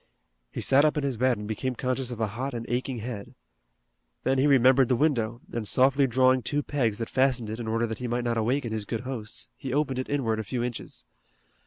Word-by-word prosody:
He - - -4
sat 135 +2 +5
up 155 0 +2
in 150 - 0
his 135 -3 -1
bed 125 +1 +2
and 105 0 -6
became 125 +4 -2
conscious 130 +1 -2
of 120 -2 -6
a 110 - +2
hot 130 +3 -3
and 115 -1 -4
aching 125 +1 -2
head. 110 -3 -6 0.9
Then 130 +1 +2
he 140 - +4
remembered 130 -1 +5
the 125 - +4
window, 120 -5 0
and 115 -3 -2
softly 135 +3 +4
drawing 130 +1 +3
two 145 +5 -1
pegs 120 -9 0
that 115 - -3
fastened 130 -4 +1
it 110 - -5
in 115 - -5
order 115 +1 +1
that 110 -1 -5
he 125 - -3
might 120 +1 -1
not 120 -1 0
awaken 120 +2 0
his 110 -2 -2
good 115 +2 -3
hosts, 125 -5 -5
he 130 - -6
opened 135 -2 0
it 130 - -4
inward 115 -6 0
a - - -2
few 120 +3 -3
inches. 120 -1 -6
125 Hz, 230 wpm, -27 LUFS, 115-135 Hz, 0.9 s, sat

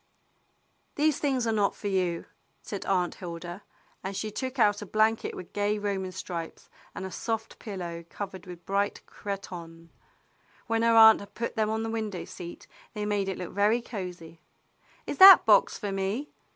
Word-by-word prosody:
"These 300 0 +2
things 265 -4 0
are 225 - +1
not 205 -2 +1
for 205 - -5
you," 180 -4 0 0.4
said 200 - -6
Aunt 180 -2 +1
Hilda. 175 +1 -7 0.4
And 190 0 -4
she 215 - -3
took 260 +4 -4
out 205 -3 +3
a - - -5
blanket 220 +2 +1
with 180 - -10
gay 205 +1 0
Roman 195 -2 -2
stripes, 170 -2 -7 0.2
and 190 - -5
a 190 - -6
soft 225 +1 -4
pillow 175 -5 -6
covered 190 -3 -7
with 175 -1 -10
bright 200 +1 -1
cretonne. 170 -4 -8 0.8
Wlien 225 -1 +1
her 230 0 +4
aunt 220 0 +9
had 200 0 -12
put 235 +1 -3
them 215 -1 +1
on 220 0 -1
the 225 - -3
window 215 -5 -3
seat 175 -1 -9 0.3
they 210 0 -2
made 205 -2 0
it 190 - -3
look 180 - -6
very 205 +4 +3
cozy. 180 -8 -8 0.6
"Is - - -5
that 385 0 +11
box - - +5
for 205 -3 -4
me. 195 +9 -2
200 Hz, 175 wpm, -28 LUFS, 180-220 Hz, 0.8 s, that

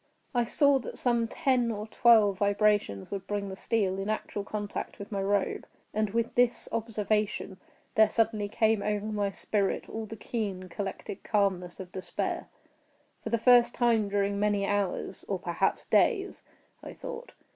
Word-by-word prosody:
I 240 -1 +2
saw 280 +3 +4
that - - -7
some 235 -2 +1
ten 255 -3 +1
or 210 -1 -4
twelve 220 -4 +4
vibrations 205 - +1
would 195 -1 -5
bring 205 -1 -2
the 190 - -6
steel 195 -2 0
in 195 +2 -3
actual 215 -1 -3
contact 205 0 -5
with 200 +1 -9
my 200 -2 -1
robe, 200 0 0 0.3
and 215 0 +1
with 230 +3 -1
this 245 -1 +2
observation 215 -3 -1 0.4
there 220 0 +5
suddenly 220 -2 0
came 220 0 +2
over 210 0 -1
my 210 -2 -1
spirit 195 0 -1
all 220 0 -5
the 225 - -7
keen, 200 -4 -4
collected 195 +1 -5
calmness 190 -4 0
of 185 -2 -8
despair. 185 -1 -3 0.7
For - - -3
the 230 - +2
first 240 +1 +5
time 230 -4 +2
during 200 0 0
many 205 -1 +1
hours—or 205 -2 -2
perhaps - - -1
days—I 395 -5 -1
thought. - - -8
210 Hz, 155 wpm, -29 LUFS, 200-230 Hz, 0.7 s, there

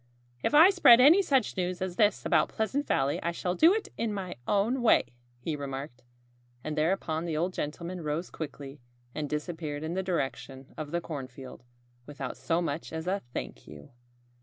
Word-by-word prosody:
"If 295 - +1
I 325 +6 +9
spread 250 -11 +7
any 310 +10 +7
such 270 - +1
news 180 0 -2
as 185 -1 -3
this 210 -1 +2
about - - +3
Pleasant 265 +7 -2
Valley 135 +1 +1
I 170 - -1
shall 180 +1 -2
do 320 - +6
it 430 +1 -1
in 230 -1 0
my 190 -3 -5
own 220 +6 +1
way," 235 - +4 0.3
he 150 +6 -4
remarked. 135 -2 -6 0.6
And 155 - -4
thereupon 160 0 0
the 160 -3 -2
old 175 +3 -1
gentleman 170 +4 -5
rose 155 +3 -3
quickly 140 -2 -8 0.3
and 150 -2 -4
disappeared 150 -1 -4
in 160 +2 -3
the 190 - -1
direction 135 -7 -4
of 155 -2 -6
the 170 +2 -2
cornfield, 130 -5 -8 0.4
without 140 -3 -6
so 170 +1 -1
much 160 0 -4
as 160 0 -5
a 195 +2 -1
"Thank - - -6
you!" 75 -1 -12
165 Hz, 180 wpm, -29 LUFS, 145-195 Hz, 0.6 s, I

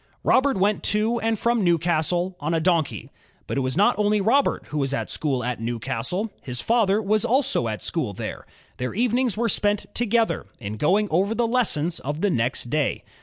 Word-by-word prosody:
Robert 270 -3 +3
went 200 +2 +1
to 220 +3 +1
and 225 0 0
from 235 0 +1
Newcastle 175 +1 +1
on 155 +3 -1
a - - +2
donkey. 165 -3 0 0.3
But - - -4
it - - +1
was 130 +3 -2
not 205 +2 +3
only 210 0 +2
Robert 240 +8 +2
who 150 - -2
was 135 0 0
at - - -4
school 135 -5 -1
at 120 -1 -3
Newcastle, 120 - -2
his 125 -2 -4
father 215 - +2
was 215 0 +1
also 265 - +1
at 110 -1 -4
school 155 -11 -1
there. 100 - -7 0.3
Their 125 +5 -4
evenings 240 0 +1
were 235 +1 +1
spent 205 -1 +1
together 230 -1 0
in 105 -2 -6
going 195 - +2
over 195 +7 +1
the 240 - +1
lessons 180 -9 +1
of 145 +4 -4
the 205 - +2
next 120 -1 -1
day. 150 -2 0
185 Hz, 190 wpm, -24 LUFS, 145-225 Hz, 0.3 s, Robert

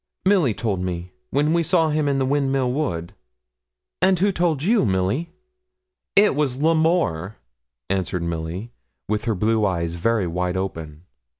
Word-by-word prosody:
'Milly 180 - +3
told 105 -6 -1
me, 90 -1 -4 0.2
when 150 +4 +1
we 170 - +3
saw 165 -1 +2
him 150 -1 +1
in 140 -1 +1
the 135 - +1
Windmill 135 -2 +1
Wood.' 85 - -2 0.9
'And 185 0 +4
who 200 +4 +2
told 170 -6 0
you, 220 +5 +3
Milly?' 100 - 0 0.9
'It 205 +1 +6
was 135 -3 -1
L'Amour,' 160 - +1 0.5
answered 95 -2 -1
Milly, 85 +6 -4 0.4
with 105 +1 -1
her 115 -2 0
blue 110 +3 +1
eyes 85 -4 0
very 105 +4 0
wide 90 +2 -2
open. 80 -5 -5
115 Hz, 145 wpm, -22 LUFS, -, 0.9 s, It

